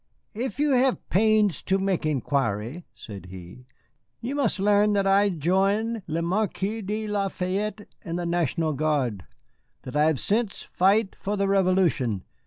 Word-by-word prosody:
"If 235 0 -4
you 295 0 +2
hev 260 0 +3
pains 215 -1 +3
to 190 - +1
mek 190 -4 0
inquiry," 135 - -1
said 100 -4 -10
he, 95 +7 -11 0.5
"you 245 +4 -4
must 270 -8 0
learn 205 +1 +3
that 200 -1 +1
I 200 +1 +4
join 195 +7 0
le 165 +1 -2
Marquis 205 +3 -1
de 215 +2 -3
La 205 -1 0
Fayette 200 +3 -3 0.2
and 170 0 -4
the 175 - -3
National 165 -2 0
Guard. 135 - -1 0.6
That 130 - -8
I 150 +1 +4
have 155 -4 +1
since 215 -1 -1
fight 195 +3 +2
for 205 +1 -2
the 200 0 +1
Revolution. 180 - +2
190 Hz, 155 wpm, -25 LUFS, 155-210 Hz, 0.6 s, I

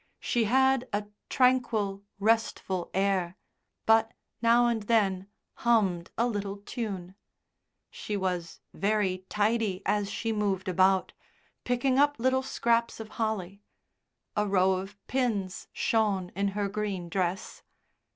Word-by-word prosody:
She 235 -2 +1
had 265 +2 +3
a 205 +1 -1 0.2
tranquil, 240 -6 +2 0.2
restful 205 -4 0
air, 190 -2 0 0.5
but, 225 0 +4 0.3
now 235 +1 +5
and 235 -2 +1
then, 200 -4 +1 0.3
hummed 195 -8 +2
a 235 - +3
little 205 -4 -3
tune. 200 -4 -5 0.8
She 210 - -4
was 180 -3 -3
very 195 -3 0
tidy 210 -2 0
as 205 -1 +1
she 225 +2 -2
moved 200 -2 -1
about, 185 +1 +3 0.5
picking 255 +2 +1
up 290 0 +4
little 260 +2 +2
scraps 235 -3 0
of 220 -1 -7
holly. 200 -3 -2 0.7
A 210 0 +1
row 190 -1 +3
of 195 +2 -3
pins 220 -8 -1
shone 200 -5 0
in 200 +1 0
her 205 -1 +1
green 200 -3 -3
dress. 180 +1 -2
205 Hz, 120 wpm, -28 LUFS, 190-230 Hz, 0.8 s, now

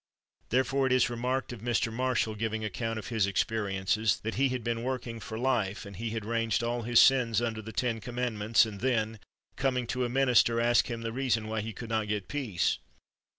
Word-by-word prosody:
Therefore 130 +2 +2
it - - -1
is 130 -1 +3
remarked 125 +2 -2
of 115 - -9
Mr. 120 -1 0
Marshall, 125 -2 0
giving 110 0 -2
account 115 +2 -3
of 110 - -6
his 110 -4 +1
experiences, 100 0 0
that 110 +1 -2
he 135 +2 +2
had 125 -2 -3
been 115 0 -1
working 125 -2 -3
for 110 +1 -6
life, 115 -6 0
and 100 -1 -9
he 115 +4 -3
had 110 -1 -4
ranged 115 +1 0
all 120 +1 -1
his 115 +1 +4
sins 120 -5 +5
under 115 -2 -2
the 110 +1 -8
ten 115 +1 -1
commandments, 115 -1 +1
and 105 -3 -7
then, 110 -4 0 0.4
coming 125 -2 0
to 125 +2 -2
a 120 - -1
minister, 125 -2 +3
asked 120 0 +3
him 115 -2 -4
the 115 0 -3
reason 120 -4 0
why 110 0 -2
he 110 +2 -5
could 110 +2 -8
not 110 -1 0
get 105 -2 -2
peace. 125 -12 -1
115 Hz, 205 wpm, -29 LUFS, 110-125 Hz, 0.4 s, sins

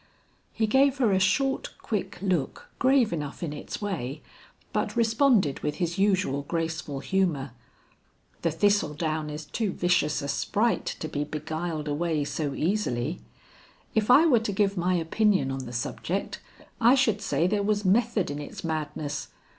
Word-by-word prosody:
He 225 - 0
gave 265 +5 +3
her 240 -6 +3
a 190 - +3
short 270 +9 +1
quick 210 -4 -3
look 180 -8 -1
grave 260 -5 +4
enough 150 0 -4
in 155 -3 -3
its 145 - -6
way, 150 -8 -4 0.5
but - - -1
responded 225 - +3
with 150 0 -2
his 175 +2 -2
usual 185 -9 +2
graceful 160 -2 -3
humor, 150 -3 0 0.9
"The 170 - +1
thistle 200 0 +2
down 155 -1 -2
is 150 +1 -6
too 215 +4 -2
vicious 175 -5 +1
a - - -3
sprite 210 +10 0
to 155 - -2
be 145 -1 -2
beguiled 155 +1 -4
away 155 0 0
so 145 -1 -3
easily. 160 - -1 0.7
If 220 -2 +1
I 280 +6 +8
were 260 -8 +5
to 220 -2 -2
give 200 0 +1
my 180 0 +1
opinion 180 -2 +2
on 135 -1 -4
the - - -7
subject, 165 +10 -3 0.4
I 240 +3 +7
should 225 -6 +2
say 170 - +1
there 200 +3 +1
was 205 0 0
method 210 -2 +2
in 145 - -4
its 145 - -8
madness. 150 -3 -3
175 Hz, 160 wpm, -27 LUFS, 150-210 Hz, 0.9 s, I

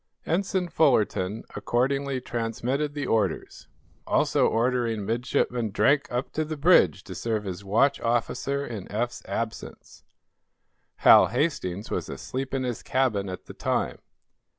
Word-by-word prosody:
Ensign 185 +1 0
Fullerton 110 - +1
accordingly 130 +5 0
transmitted 125 +5 -2
the 145 -2 -2
orders, 105 -8 -1 0.4
also - - +3
ordering 115 -3 0
Midshipman 120 +1 0
Drake 140 +8 +2
up 125 +2 -2
to 155 - -1
the 155 0 -5
bridge 145 - +4
to - - -8
serve 110 -2 -2
as 95 0 -5
watch 115 +8 +2
officer 125 +4 -1
in 110 -7 -7
Eph's 120 +3 -2
absence. 115 -1 -6 1.0
Hal - - +9
Hastings 115 - -2
was - - -2
asleep 130 +1 -5
in 135 -1 -1
his 125 -2 -3
cabin 115 -7 0
at 90 - -7
the - - -10
time. - - -1
120 Hz, 130 wpm, -26 LUFS, 110-140 Hz, 1.0 s, Hal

